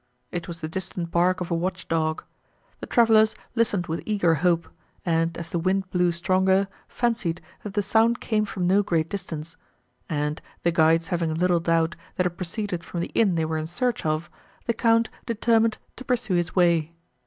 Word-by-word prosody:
—It 175 -1 -4
was 170 -1 -6
the 155 - -2
distant 175 0 -4
bark 180 +2 +2
of 180 - -4
a - - +2
watch 180 +2 -3
dog. 160 -1 0 0.6
The - - -7
travellers 220 -2 +5 0.2
listened 220 -6 +1
with 165 +1 -3
eager 200 -6 +2
hope, 170 +1 +1 0.4
and, 165 -1 +1
as 170 0 -7
the 170 - 0
wind 185 +2 0
blew 180 -1 +2
stronger, 190 +3 +2 0.2
fancied, 215 -8 -1 0.2
that 210 -1 -7
the 205 - +2
sound 225 +4 +3
came 215 -2 0
from 190 -3 -3
no 190 +3 +4
great 165 -5 0
distance; 165 -5 -6 0.5
and, 150 -1 -1 0.2
the 170 - +3
guides 165 +1 +3
having 165 -3 0
little 175 +1 +2
doubt, 165 0 +1 0.2
that 180 - +1
it 180 - +1
proceeded 180 +1 -4
from 170 0 -4
the - - -4
inn 200 -6 +3
they 160 -1 +1
were 160 0 -1
in 155 - -4
search 245 +8 -1
of, 155 +2 -1 0.4
the 235 - +1
Count 230 0 +2 0.2
determined 230 0 +2 0.2
to 255 - -8
pursue 245 -6 0
his 175 -2 0
way. 170 -3 +3
175 Hz, 190 wpm, -25 LUFS, 165-205 Hz, 0.6 s, travellers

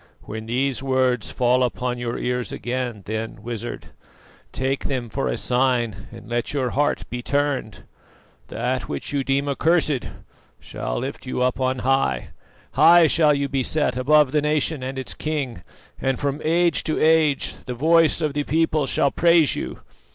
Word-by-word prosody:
When 110 +1 -7
these 130 +1 0
words 130 -3 +1
fall 125 +1 +2
upon 125 0 -1
your 120 -1 -3
ears 125 0 -2
again, 120 -4 -4
then, 110 0 -5
Wizard, 120 0 -6 0.6
take 135 +1 -2
them 125 -4 -2
for 135 +4 -2
a - - -1
sign 125 -3 0
and 115 0 -11
let 120 +2 -2
your 130 -4 -1
heart 145 +1 0
be 125 0 -3
turned. 140 -5 -1 0.6
That 125 +2 -2
which - - -4
you 140 -1 0
deem 135 +1 0
accursed 155 -1 +1 0.5
shall - - -5
lift 135 +1 -5
you 125 - -1
up 125 0 0
on 130 0 0
high. 130 - +1 0.4
High 170 0 +7
shall 155 -2 +4
you 140 0 -1
be 135 -1 -1
set 130 -1 0
above 145 +2 +4
the 150 - +2
nation 150 0 0
and 130 +1 -5
its 130 - -5
king, 140 - -3 0.4
and 135 -1 -1
from 145 +1 -2
age 170 0 +2
to 155 - -1
age 155 -3 +2
the 125 - -3
voice 165 +4 +3
of 150 -2 0
the 145 0 -1
people 155 -1 +1
shall 140 - +1
praise 170 -3 +4
you. - - -5
135 Hz, 165 wpm, -23 LUFS, 125-150 Hz, 0.6 s, High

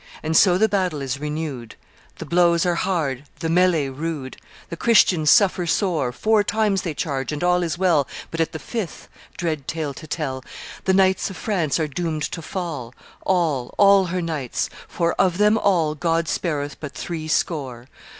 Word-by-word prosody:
And 160 +1 -1
so 180 0 +6
the 220 +3 +4
battle 185 -7 0
is 135 0 -3
renewed: 150 -6 -5 0.4
The - - -7
blows 170 0 +3
are 175 - +2
hard, 150 -7 -1
the 165 - -3
melley 170 -4 +3
rude; 140 -1 -5 0.3
The 170 - -5
Christians 180 -7 +4
suffer 190 -5 +4
sore 165 - +1
Four 215 - +2
times 205 -3 +1
they 165 -4 -4
charge 135 -4 -2
and 150 +2 -4
all 180 0 +3
is 170 -1 -2
well, 170 -7 +2 0.2
But 165 - -5
at 165 - 0
the - - -5
fifth 210 +1 -5 0.3
dread 155 -5 -3
tale 155 -3 -3
to 155 +3 -11
tell 135 -4 -3 0.4
The 190 - +3
knights 190 0 +3
of 195 - -8
France 175 -9 0
are 155 - 0
doomed 155 +1 -3
to 165 - -5
fall, 155 -9 -5 0.3
All, 160 -9 0
all 200 -1 +6
her 180 0 -2
knights; 150 -7 -3 0.2
for 170 -1 0
of 180 -2 +2
them 210 +1 +4
all 175 -8 +2
God 165 +1 0
spareth 145 -4 -2
but 145 -3 -7
threescore. 155 -6 -2
165 Hz, 175 wpm, -22 LUFS, 150-185 Hz, 0.4 s, so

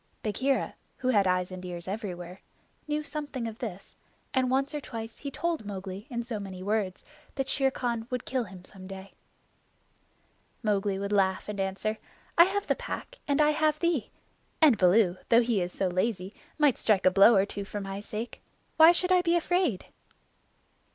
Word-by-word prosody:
Bagheera, 260 +6 0 0.2
who 255 - -1
had 205 -6 +4
eyes 180 0 +1
and 185 0 -7
ears 175 -1 -6
everywhere, 185 -3 -5 0.5
knew 300 0 -1
something 290 -6 -4
of 225 0 -8
this, 195 -5 -7 0.4
and 260 -1 +2
once 270 +3 +1
or 295 - -3
twice 225 -3 -7
he 280 - -5
told 330 0 -2
Mowgli 195 +1 -6
in 235 -2 -3
so 230 -2 -4
many 190 -2 -7
words 205 -2 -1 0.3
that 270 -1 -1
Shere 270 -1 +2
Khan 235 -3 -3
would 250 -1 -3
kill 255 -3 -1
him 185 -2 -12
some 185 -1 -11
day. 195 0 -9 1.5
Mowgli 205 -2 +1
would 200 +1 -3
laugh 190 -2 +2
and 210 -1 -5
answer: 195 +3 -2 0.4
"I 340 - +9
have 400 +2 -1
the - - +2
Pack - - -7
and 285 0 +1
I 300 0 +5
have 305 0 +2
thee; 325 -8 0 0.5
and 305 -7 +7
Baloo, 185 -1 +4
though 235 +1 +6
he 230 -5 +1
is 175 0 -2
so 190 - -1
lazy, 185 +1 -1 0.2
might 295 -4 +3
strike 210 -4 +2
a 185 - +7
blow 200 +5 +7
or 195 0 +4
two 200 0 -5
for 205 +1 -5
my 195 0 -5
sake. 215 +3 -6 0.4
Why 320 +1 +9
should 360 +1 0
I 365 -1 +6
be 340 0 +2
afraid?" 345 - +1
220 Hz, 185 wpm, -28 LUFS, 195-275 Hz, 1.5 s, I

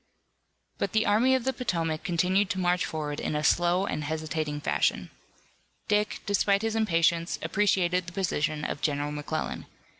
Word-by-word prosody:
But - - -1
the 220 0 +3
Army 240 +6 +4
of 260 - -1
the 265 +1 0
Potomac 165 -10 -2
continued 185 +2 +1
to 190 - -2
march 180 0 +1
forward 150 -2 -4
in - - -2
a 150 - -1
slow 175 +4 +3
and 150 - -3
hesitating 155 0 -3
fashion. - - 0 0.8
Dick, 210 0 0
despite 200 0 +2
his 225 0 -1
impatience, 170 -5 +2
appreciated 185 -3 +1
the - - -6
position 155 -5 -1
of - - -4
General 145 0 -1
McClellan. 150 +1 -4
175 Hz, 155 wpm, -27 LUFS, 155-200 Hz, 0.8 s, Army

